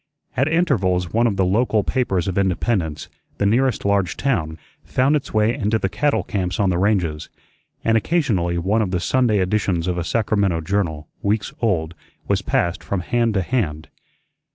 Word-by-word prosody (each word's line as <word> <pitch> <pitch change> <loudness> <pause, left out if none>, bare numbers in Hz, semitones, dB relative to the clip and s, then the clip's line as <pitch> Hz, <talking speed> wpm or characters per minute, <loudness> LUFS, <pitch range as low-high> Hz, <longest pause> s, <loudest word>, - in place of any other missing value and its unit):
At 135 +3 +2
intervals 100 - +1
one 115 +2 +3
of 105 - 0
the 95 - +2
local 105 +2 +2
papers 105 -10 0
of 95 - -2
Independence, 95 -4 0 0.3
the 100 - 0
nearest 125 +4 +1
large 100 -3 +1
town, 85 - -1 0.3
found 135 +4 +2
its 145 - -3
way 110 +1 +2
into 110 -1 0
the 95 - -1
cattle 140 -4 0
camps 90 -2 -3
on 100 -3 +3
the 85 - 0
ranges, 90 -7 0 0.5
and 115 - +2
occasionally 110 - +1
one 100 +6 +1
of 105 - -1
the 90 -1 -1
Sunday 120 +3 +2
editions 95 -3 0
of 90 -1 -1
a - - -1
Sacramento 100 -4 0
journal, 80 -4 -2
weeks 105 +1 -1
old, 85 -8 0 0.3
was - - +1
passed 85 0 -1
from 100 -2 -2
hand 115 +3 0
to 95 - +1
hand. 80 -9 -2
100 Hz, 175 wpm, -21 LUFS, 90-115 Hz, 0.5 s, one